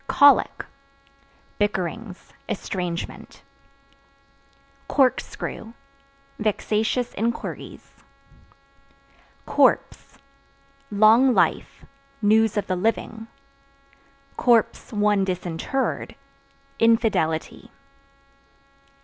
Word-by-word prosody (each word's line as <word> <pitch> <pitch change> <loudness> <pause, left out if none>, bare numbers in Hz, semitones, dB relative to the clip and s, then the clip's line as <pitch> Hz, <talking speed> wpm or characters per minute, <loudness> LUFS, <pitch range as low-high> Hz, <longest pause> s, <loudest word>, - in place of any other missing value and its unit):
Colic 285 0 +4 0.9
Bickerings, 205 0 -3 0.2
estrangement 180 -4 -5 1.4
Corkscrew 250 -4 -1 0.7
Vexatious 220 +3 -1
inquiries. 230 +3 -5 1.5
Corpse - - +1 0.7
Long 220 +5 +5
life; - - 0 0.3
news 220 0 +3
of 205 - 0
the 185 - -2
living; 225 +3 -2 1.6
(one 205 -2 +1
disinterred) 185 +7 -3 0.6
infidelity. 225 -9 +1
215 Hz, 50 wpm, -23 LUFS, 190-230 Hz, 1.6 s, Long